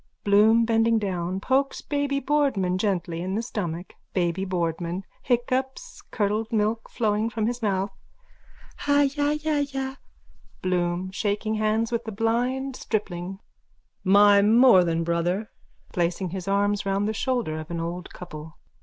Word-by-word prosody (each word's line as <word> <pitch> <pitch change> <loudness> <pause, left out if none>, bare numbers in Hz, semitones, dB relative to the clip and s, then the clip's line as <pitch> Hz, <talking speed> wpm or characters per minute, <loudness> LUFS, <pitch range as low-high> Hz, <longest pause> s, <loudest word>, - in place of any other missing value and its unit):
(Bloom, 215 +3 +5
bending 225 0 +3
down, 185 -3 -2
pokes 270 +6 0
Baby 285 -1 -1
Boardman 260 -11 +1
gently 175 -5 -1
in 185 +2 -2
the 225 - -1
stomach.) 175 -5 -4 0.2
BABY 180 +1 0
BOARDMAN: 175 0 -2 0.2
(Hiccups, 260 - -1
curdled 215 +1 -1
milk 220 +1 0
flowing 215 0 0
from 220 -1 -2
his 240 +2 -2
mouth.) 195 -2 0 1.0
Hajajaja. 285 -1 +1 0.7
BLOOM: 180 0 0
(Shaking 210 +2 -1
hands 220 +1 0
with 235 0 -2
a - - -2
blind 245 +5 0
stripling.) 190 -5 -3 0.7
My 200 +1 +6
more 220 -2 +6
than 165 -1 0
Brother! 175 +5 -1 0.4
_(Placing 175 0 -1
his 185 -1 -5
arms 205 +1 +1
round 195 +1 0
the 215 - -1
shoulders 225 -10 -1
of 155 - -11
an 170 -1 -3
old 170 +2 -5
couple.) 155 -3 -10
205 Hz, 130 wpm, -25 LUFS, 180-235 Hz, 1.0 s, My